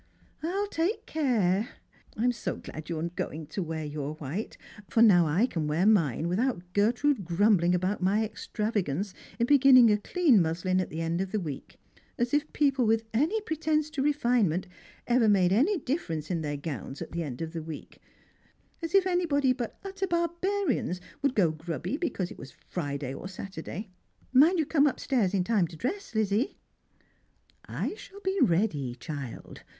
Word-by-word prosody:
" - - -35
I'll 380 +6 -1
take 345 +6 -1
care. 225 - +1 0.5
I'm 245 +3 +2
so 235 - -4
glad 155 +1 -9
you're 160 -2 -2
going 165 -2 -4
to 160 +6 -4
wear 160 -2 -4
your 150 0 -4
white: 155 +8 -5 0.3
/or 230 0 +6
now 175 -6 +6
I 175 +10 +3
can 165 -11 -2
wear 160 +5 +1
mine 165 - +3
\vithout 185 +2 0
Gerti'ude 235 +4 +2
grumbling 180 0 +3
about 185 +3 -1
my 205 +4 +2
extravagance 205 -5 -2 0.2
in 235 - +2
beginning 260 -4 +7
a 210 - +2
clean 280 - +3
muslin 180 +3 0
at 185 - -4
the 160 - -4
end 165 +2 -1
of 190 -1 -3
the 215 - 0
week; 150 -7 -7 0.4
as 240 +1 -1
if 295 +1 +1
people 275 -5 +2
with 225 0 +2
any 320 - +1
pretence 310 -4 -1
to 295 -4 -2
refinement 240 - +2 0.4
ever 240 -2 +3
made 185 -3 +4
any 310 - +3
dif 300 +1 -2
ference 155 0 -4
in 170 -2 -1
their 145 -1 -3
gowns 140 -1 -5
at - - -12
the 170 - -3
end 135 -6 -5
of 165 0 -5
the 165 - -4
week 155 -1 -9 0.4
— - - -36
as 330 +3 -2
if 390 -1 +5
anybody 310 -8 +2
but 240 -3 -5
utter 390 0 -3
barbarians 340 - 0 0.2
would 280 -2 +1
go 180 -6 +4
grubby 165 - -4
because 290 - -2
it - - -11
was 130 - -11 0.2
Friday 140 -5 -3
oi 180 - -7
Saturday! 190 +1 -7 0.4
Mind 310 +8 +6
you 315 - +2
come 290 0 +3
up 280 - -1
stairs 215 -8 +1
in 185 - +2
time 200 -3 +2
to 165 - -11
dress, 255 - -4
Lizzie." 215 +3 +1 0.6
" - - -31 0.2
I - - -1
shall 400 -1 -12
be 385 0 -1
ready, 165 - +1
child. 135 0 -7
210 Hz, 180 wpm, -28 LUFS, 165-280 Hz, 0.6 s, beginning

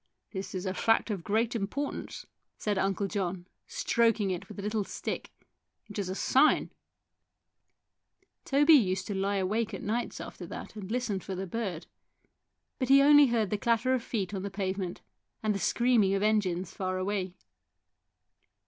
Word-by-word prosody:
" - - -54
This 190 -1 -5
is 185 +1 -3
a 185 - -1
fact 225 +2 +2
of 190 -5 -3
great 225 +5 0
importance," 230 +7 -4 0.3
said 205 -2 -1
Uncle 195 +1 0
John, 185 -3 -3 0.2
stroking 230 - +1
it 180 - -5
with 210 - -10
a 200 - -5
little 210 0 0
stick. - - -5 0.3
" - - -54
It 205 - -5
is 190 -2 -2
a 185 - -3
sign! 270 +8 +3 0.9
" - - -47
Toby 290 +3 +5
used 190 -9 +4
to 205 - -3
lie 195 +1 0
awake 210 +3 0
at - - -8
nights 235 +3 -2
after - - -8
that - - -8
and 200 -3 -7
listen 240 -5 -1
for 190 +1 -6
the 190 +1 -3
bird, 190 -4 -4 0.9
but 255 -2 -1
he 275 +1 +7
only 290 0 +8
heard 225 -4 0
the 210 - 0
clatter 235 +3 +2
of 255 - +1
feet 205 -5 -3
on 190 - -3
the 200 - -4
pavement 190 -2 -3 0.4
and 215 -1 +2
the 200 - -3
screaming 230 -4 +3
of 195 - 0
engines 190 -4 +1
far 185 -1 -2
away. 185 -1 -2
205 Hz, 175 wpm, -29 LUFS, 190-230 Hz, 0.9 s, only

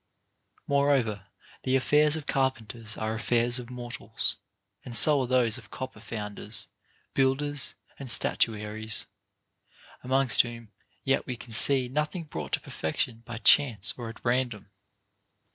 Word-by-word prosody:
4. 140 0 +2
Moreover, 115 -9 +1 0.3
the 130 0 0
affairs 150 +3 +3
of 155 -2 -5
carpenters 120 -5 -2
are 110 0 -2
affairs 120 +2 +1
of 120 -1 -9
mor 120 -1 -7
tals, - - -2 0.5
and 120 -2 -2
so 145 +6 +7
are 130 - -2
those 125 -1 +1
of 105 -5 -17
copper 130 0 -7
founders, 105 -1 -6 0.5
builders, 140 +2 0 0.2
and 135 -2 -7
statuaries; 110 -1 +2 1.0
amongst 130 -1 +5
whom 115 -2 -9 0.3
yet 135 0 +2
Ave 125 - -4
can 115 0 -12
see 130 +3 +4
nothing 150 +6 -2
brought 80 - -7
to - - +2
perfection 115 +9 -4
by 120 -2 -6
chance 115 -3 +4
or 120 -2 -6
at 115 - -13
random. 120 -5 -1
120 Hz, 140 wpm, -27 LUFS, 110-135 Hz, 1.0 s, so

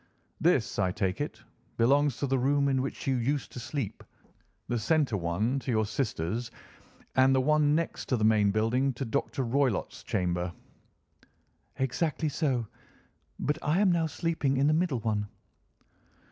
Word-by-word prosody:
"This, 160 - +2
I 95 -2 +2
take 95 -2 -1
it, - - -5 0.3
belongs 140 +3 +3
to - - -1
the 135 -1 +1
room 140 +2 +2
in 130 -1 +2
which 135 - -5
you 135 -1 +1
used 135 +4 -1
to - - -7
sleep, 120 -4 -4 0.6
the 120 - -1
centre 140 0 +1
one 100 +9 0
to 130 - -7
your 110 -2 +2
sister's, 110 - -2 0.7
and 130 +1 +5
the - - +4
one 150 +2 +3
next 165 +1 -2
to 125 - +2
the 110 - -1
main 110 -2 +4
building 115 +6 +1
to 130 +3 -4
Dr. 135 +2 -1
Roylott's 130 -2 0
chamber?" 90 -1 -1 1.3
"Exactly 150 +4 0
so. 135 -6 0 0.7
But 150 +2 -1
I 155 +5 +1
am 200 -3 +4
now 165 -2 +2
sleeping 155 -4 -1
in 135 - +3
the 150 - +4
middle 155 -7 +1
one." 105 -2 -1
130 Hz, 160 wpm, -29 LUFS, 110-145 Hz, 1.3 s, and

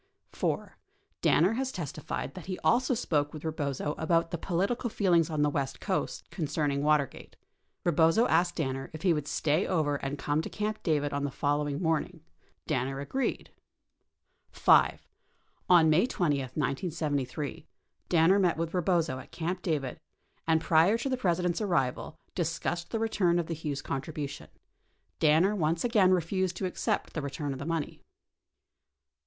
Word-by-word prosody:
4. - - -3 0.4
Danner 180 +7 +4
has 260 +2 -2
testified 150 - -5
that 180 - -10
he 185 -1 -3
also 255 +1 +3
spoke 150 -10 0
with 155 - -9
Eebozo 150 -2 -2
about 165 +1 +1
the 170 - -2
political 200 +9 -1
feelings 175 -6 +2
on 155 -2 0
the - - +4
west 135 -2 -2
coast 190 -3 -2
concerning 145 -4 -1
Watergate. 150 -2 0 0.5
Ee - - +5
bozo 165 +9 +4
asked 175 +2 +2
Danner 135 -4 -3
if 155 - -8
he 180 -3 +4
would 150 -2 -3
stay 155 +5 +1
over 150 -5 +1
and 140 +1 -4
come 145 +2 0
to - - -6
Camp 215 0 -3
David 145 -4 0
on 140 0 -1
the 145 - 0
following 145 +1 -1
morning. 165 0 -1 0.4
Danner 135 +2 -1
agreed. 255 - -2 1.0
5. - - +3 0.6
On 175 -3 +7
May 165 +9 +4
20, 150 - 0
1973, 145 +1 -3 0.4
Danner 175 +4 +5
met 180 -4 +2
with 165 0 -2
Eebozo 170 -7 0
at - - -16
Camp 175 +2 -3
David 150 -8 -2 0.5
and 160 -1 +3
prior 165 +7 +4
to 255 +4 -3
the 260 - +1
President's 180 -4 0
arrival 140 -8 -1 0.2
discussed 170 0 -2
the 225 - -2
return 205 -6 +1
of 170 - 0
the 165 - -4
Hughes 150 -3 -4
contribution. 145 +1 -5 0.7
Danner 165 +7 +4
once 165 -2 0
again 215 -6 +4
refused 185 +1 0
to 190 - -2
accept 180 - -2
the 155 - -2
return 140 0 -4
of 130 - -7
the 140 - -5
money. 165 -3 -3
160 Hz, 155 wpm, -29 LUFS, 145-180 Hz, 1.0 s, On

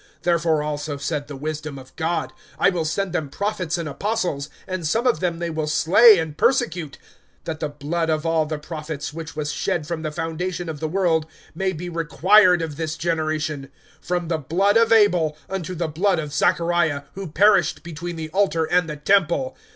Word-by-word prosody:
(49)Therefore 165 -3 +2
also 150 -1 -3
said 145 0 -3
the 145 - -7
wisdom 155 0 -5
of 130 0 -13
God: 165 +2 -2 0.2
I - - +4
will 170 -3 -2
send 185 +3 -2
them 155 -5 -2
prophets 185 0 -2
and 170 -2 -4
apostles, 175 -4 -2 0.2
and 185 -4 -3
some 230 +10 0
of 250 - +3
them 175 -2 -1
they 170 0 -3
will 155 -1 -2
slay 190 +8 +6
and 160 -3 -3
persecute; 165 - 0 0.5
(50)that 160 -1 -4
the 150 - -2
blood 155 +3 -2
of 155 0 0
all 165 -1 +2
the 155 0 -3
prophets, 150 -1 -6
which 165 0 -7
was 150 -1 -2
shed 155 0 -1
from 165 0 -4
the 155 - -2
foundation 175 +2 -3
of 155 -2 -5
the 160 - -2
world, 165 -3 +1 0.3
may 190 +3 -1
be 175 0 -6
required 175 +2 +4
of 150 -3 -5
this 160 -1 -3
generation, 155 -3 -2 0.3
(51)from 175 -1 -1
the 165 -2 0
blood 185 +8 +1
of 230 0 +4
Abel 180 -9 +4
unto 185 -2 -4
the 170 -1 -1
blood 180 +5 +1
of 150 -2 -4
Zachariah, 165 -2 +1
who 195 -1 -6
perished 200 +7 +3
between 170 +1 -6
the 160 -1 -5
altar 175 -2 +1
and 175 0 +1
the 150 - -5
temple. 160 -5 +2
165 Hz, 190 wpm, -22 LUFS, 155-180 Hz, 0.5 s, slay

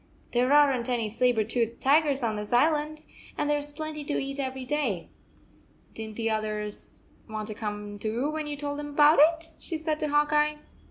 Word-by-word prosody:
"There 250 +2 +2
aren 285 -4 +5
t 250 - -1
any 230 -3 0
saber 235 0 +2
toothed 230 +1 -1
tigers 280 -1 +3
on 220 -2 0
this 210 0 -5
island, 305 +4 +2 0.3
and - - 0
there 295 0 +2
s 290 0 -3
plenty 310 0 -5
to 290 - -2
eat 275 +1 -3
every 265 -1 -3
day. 250 - -1 0.8
Did 225 - -5
n 215 - -11
t 230 - -4
the 225 - +1
others 215 -1 -3 0.3
want 215 0 -4
to - - -4
come 205 -1 -5
too 235 +8 -1
when 310 -1 -3
you 295 -1 -3
told 285 0 -4
them 295 0 -5
about 295 +2 +5
it?" 325 +1 +3
she 325 - -3
said 315 -1 -2
to 305 - -1
Hawk 295 +1 +2
Eye. 300 0 +3
275 Hz, 210 wpm, -27 LUFS, 225-300 Hz, 0.8 s, aren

